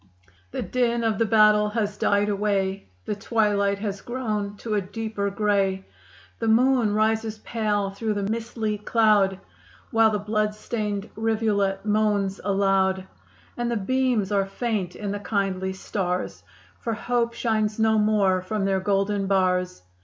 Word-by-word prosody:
The - - -4
din 235 -2 0
of 220 -3 0
the 230 - +2
battle 210 0 +5
has 210 -2 -2
died 205 0 +2
away; 195 - -1 0.2
The - - -1
twilight 200 -2 +1
has 200 -1 -4
grown 215 -5 -3
to 220 +1 -4
a 205 - +2
deeper 205 +1 -3
gray; 195 -2 0 0.5
The 225 - -1
moon 235 -1 +3
rises 220 0 +1
pale 210 -3 -1
through 215 +2 -2
the 200 - -2
mistly 220 0 -3
cloud, 210 -4 +3 0.5
While 225 -2 +5
the 215 - 0
blood 210 0 -1
stained 210 -2 -3
rivulet 215 -3 0
moans 205 -2 +1
aloud; 195 -1 +1 0.5
And 240 0 -2
the 235 - 0
beams 240 -1 0
are 195 -1 +1
faint 195 -4 -2
in 205 -1 -4
the 205 - -3
kindly 195 -2 -1
stars, 185 -1 -3 0.4
For 230 - -2
hope 235 +1 -1
shines 215 -3 0
no 220 -1 +3
more 205 -3 +2
from 195 +2 -2
their 195 -1 +1
golden 195 +1 0
bars. 180 - +1
210 Hz, 145 wpm, -24 LUFS, 195-220 Hz, 0.5 s, battle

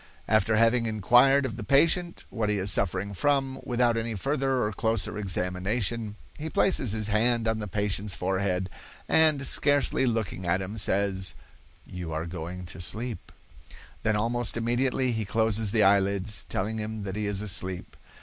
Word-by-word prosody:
"After 110 0 +2
having 115 +1 +3
inquired 120 +6 +4
of 115 -4 -5
the 115 - -6
patient 165 - +2
what 110 -2 -2
he 105 - 0
is 95 +1 +2
suffering 100 +1 0
from, 135 +3 0
without 120 -1 +1
any 115 0 -3
further 135 +3 0
or 105 0 -2
closer 110 -1 -1
examination, 100 +3 -2 0.2
he 155 +2 -4
places 135 - +3
his 110 -1 -1
hand 115 +2 +1
on 110 0 0
the 105 - -5
patient's 100 0 -1
forehead 95 0 -1 0.4
and, 155 -4 +3
scarcely 145 -1 +2
looking 110 -6 -2
at 90 +2 +1
him, 95 +3 -6
says, 95 -1 0 0.5
'You 90 -3 -7
are 80 +1 -3
going 90 +1 -7
to 90 - -9
sleep.' 115 +5 -4 0.7
Then, 110 -1 0
almost 115 +2 -1
immediately, 125 +2 0
he 110 -1 -2
closes 110 0 +1
the 110 +1 +2
eyelids, 100 +1 +2
telling 110 +3 -2
him 110 0 -5
that 95 -1 -5
he 105 -1 -2
is 100 0 -2
asleep. 95 -3 -2
110 Hz, 160 wpm, -27 LUFS, 95-120 Hz, 0.7 s, inquired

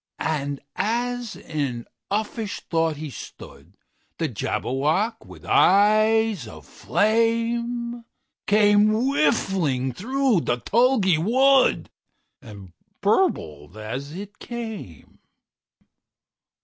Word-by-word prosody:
And 145 -3 -2
as 240 +2 -2
in 135 -7 -4 0.2
uffish 215 +1 -3
thought 165 -2 0
he 150 -1 -6
stood, - - -12 0.4
The - - -1
Jabberwock, 160 - -1
with - - -13
eyes 215 - +3
of 80 -8 -12
flame, 230 - 0 0.4
Came 205 0 +5
whiffling 195 - +1
through 255 - +1
the 120 - -1
tulgey 210 - +2
wood, 260 +8 +3 0.5
And 100 -8 -12 0.3
burbled 85 - 0
as 125 +7 -6
it 205 +3 -9
came! 220 - -8
205 Hz, 85 wpm, -23 LUFS, 140-230 Hz, 0.5 s, Came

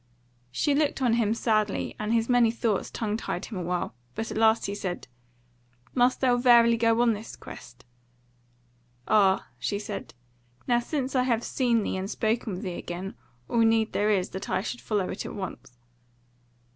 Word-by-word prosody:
She 285 - +1
looked 290 0 +1
on 240 -3 +3
him 225 -2 +2
sadly, 215 -3 0
and 215 +1 -2
his 230 -1 +2
many 245 -2 +4
thoughts 225 -3 -1
tongue 215 -1 -2
tied - - -4
him 215 - -7
a - - -3
while; 175 0 -2 0.2
but 225 - -4
at - - -4
last 220 0 +4
he 200 - -3
said: 185 -6 -4 0.9
"Must 250 0 +3
thou 250 -2 +4
verily 235 -2 +6
go 230 +1 +3
on 235 -2 +4
this 215 +2 -8
quest?" 125 +1 -12 1.2
"Ah," 195 -3 +3
she 200 - -1
said, 205 -8 -6 0.5
"now 240 -1 +3
since 265 +2 -3
I 255 - +4
have 240 -2 +1
seen 235 -4 +1
thee - - -2
and 190 +1 -4
spoken 220 -1 -1
with 180 - -6
thee 180 -3 -4
again, 180 +3 -6 0.3
all 235 - 0
need 225 -1 +3
there 210 +1 +1
is 190 -3 +1
that 190 +2 -6
I - - +1
should 245 - -5
follow 205 -4 -1
it - - -4
at - - -7
once." 185 -10 -7
225 Hz, 185 wpm, -27 LUFS, 200-240 Hz, 1.2 s, verily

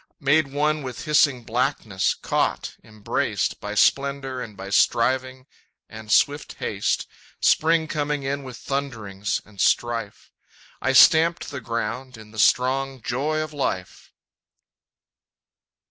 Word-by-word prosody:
Made 150 0 +3
one 150 +2 0
with 130 0 -7
hissing 145 -5 +3
blackness, 115 -5 -1
caught, - - -1
embraced, 110 -1 -2
By 105 +1 -5
splendor 135 +1 +1
and 105 -4 -8
by 95 +1 -8
striving 130 +4 +1 0.4
and 110 0 -9
swift 145 +1 +2
haste - - -2 0.3
Spring 160 0 +3
coming 150 -2 -2
in 140 +1 -2
with 130 -2 -9
thunderings 110 -8 -3
and 100 -2 -8
strife 115 -3 0 0.5
I 135 - +1
stamped 160 +4 +5
the 140 -2 -6
ground 115 +2 -4
in 110 -1 -14
the 110 - -8
strong 135 +3 +2
joy 150 +5 -1
of 155 -1 -5
life! 95 -10 -4
130 Hz, 120 wpm, -23 LUFS, 110-145 Hz, 0.5 s, stamped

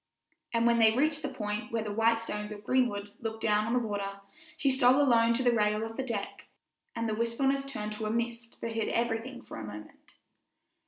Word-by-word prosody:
And 230 0 +2
when 235 0 +4
they 220 -1 +6
reached 300 +3 +2
the 285 - -2
point 210 -4 -4
where 225 -1 -1
the 210 - -4
white 225 +1 +3
stones 210 -2 -4
of 205 0 -8
Greenwood 205 -4 +1
look 225 -1 -4
down 215 -1 +2
on 230 - 0
the 245 -2 +1
water, 200 -1 -4 0.4
she 275 -3 +2
stole 260 +1 +5
alone 235 -4 +4
to 260 - +1
the 245 - +5
rail 210 -1 +2
of 225 0 -7
the - - -2
deck, 230 -6 -4 0.5
and 230 0 -1
the 220 - -1
wistfulness 270 +5 0
turned 215 -6 -4
to 215 0 -3
a - - -1
mist 235 +1 -3
that 230 - -3
hid 225 -1 -1
everything 235 +2 -2
for - - -9
a - - -6
moment. 105 0 -11
230 Hz, 215 wpm, -30 LUFS, 210-245 Hz, 0.5 s, they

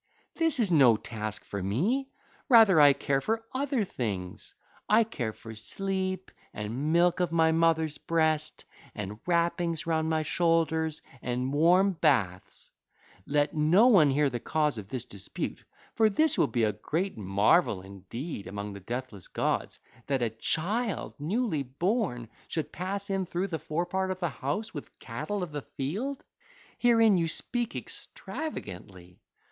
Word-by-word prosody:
This 325 -5 +1
is 210 -6 +2
no 135 -8 +6
task 110 -1 -6
for 100 - -5
me: 195 - 0 0.4
rather 220 - +7
I 145 -1 +9
care 135 0 0
for 225 +5 -1
other 265 -3 0
things: 100 - -5 0.3
I 220 +2 +6
care 130 - -4
for 110 +1 -11
sleep, 190 - -3 0.2
and 120 +9 -3
milk 175 +1 +3
of 175 -2 +1
my 160 -1 +4
mother's 160 -2 +2
breast, 155 -2 0 0.3
and 105 +1 -5
wrappings 170 -1 +1
round 160 -1 0
my 160 -1 +1
shoulders, 160 -1 +1 0.2
and 125 +2 -2
warm 180 +6 +5
baths. 120 - 0 0.6
Let 145 +1 +1
no 160 +8 +5
one 175 - +6
hear 145 +2 +3
the 120 - -3
cause 150 -2 0
of 100 - -9
this 125 +2 -4
dispute; 100 -1 -6 0.3
for 220 -1 +4
this 310 +10 +2
would - - +2
be 120 -3 +1
a 105 -1 +2
great 165 - -2
marvel 100 - +2
indeed 100 - -7
among 100 +1 -5
the 100 - -8
deathless 115 -1 -6
gods, - - -2 0.3
that 135 -3 +1
a 115 - 0
child 195 - -2
newly 180 - 0
born 140 - -1 0.2
should 160 - -3
pass 195 +3 -4
in 190 -2 -1
through 180 +4 -2
the 160 -2 -3
forepart 175 +5 -2
of 185 0 -3
the 175 -2 0
house 150 +11 -3
with - - -9
cattle 205 -2 -4
of 175 - -6
the 145 -1 -4
field: 205 - -4 0.5
herein 225 -5 +5
you 165 - +1
speak 240 +8 -2
extravagantly. 95 - -7
160 Hz, 150 wpm, -29 LUFS, 120-190 Hz, 0.6 s, I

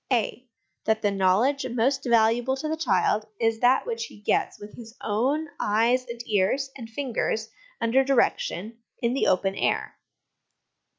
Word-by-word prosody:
(a) 250 +1 0 0.4
That 220 0 +1
the 205 - +2
knowledge 200 +9 +2
most 260 +4 0
valuable 235 +2 +3
to 310 - -4
the 315 - -1
child 220 -9 +1
is 225 -1 +1
that 250 +2 +3
which 470 -1 -3
he - - -13
gets 205 - 0
with 205 0 -10
his 230 -1 -12
own 265 +9 0
eyes 235 +4 +2
and 235 0 -7
ears 220 +7 +1
and 230 -4 -9
fingers 225 -3 -2 0.3
(under 235 +4 +3
direction) 230 -5 0 0.2
in 235 0 0
the 270 - +1
open 190 +1 +2
air. - - -1
235 Hz, 155 wpm, -26 LUFS, 220-265 Hz, 0.4 s, valuable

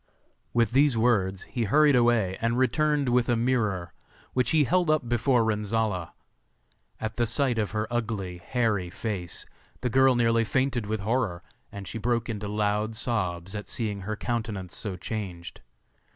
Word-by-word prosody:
With 115 -3 +2
these 135 -1 +4
words 100 -5 +2
he 120 -2 -3
hurried 145 +5 +5
away, 120 -6 +3
and 115 +1 +1
returned 150 +2 +2
with 125 0 +2
a 120 - +3
mirror, 110 -8 0 0.4
which 125 -1 +1
he 155 -2 +4
held 175 +4 +2
up 155 -5 +2
before 120 +1 +2
Renzolla. 105 -4 -1 0.9
At 110 0 -4
the 120 -1 +2
sight 120 0 +1
of 105 - 0
her 110 0 -1
ugly, 105 -7 -2
hairy 105 -4 0
face, 95 -3 -4 0.4
the 125 -2 -1
girl 130 0 +5
nearly 115 -1 +3
fainted 130 -1 0
with 110 -1 -2
horror, 105 -5 -1 0.3
and 100 -2 -8
she 115 - -5
broke 115 +1 0
into 105 -2 -3
loud 105 +1 0
sobs 95 -6 -1
at 105 -1 -6
seeing 105 -4 -3
her 110 +3 -3
countenance 110 -6 -3
so 100 -4 -3
changed. 90 -3 -6
115 Hz, 160 wpm, -27 LUFS, 100-120 Hz, 0.9 s, hurried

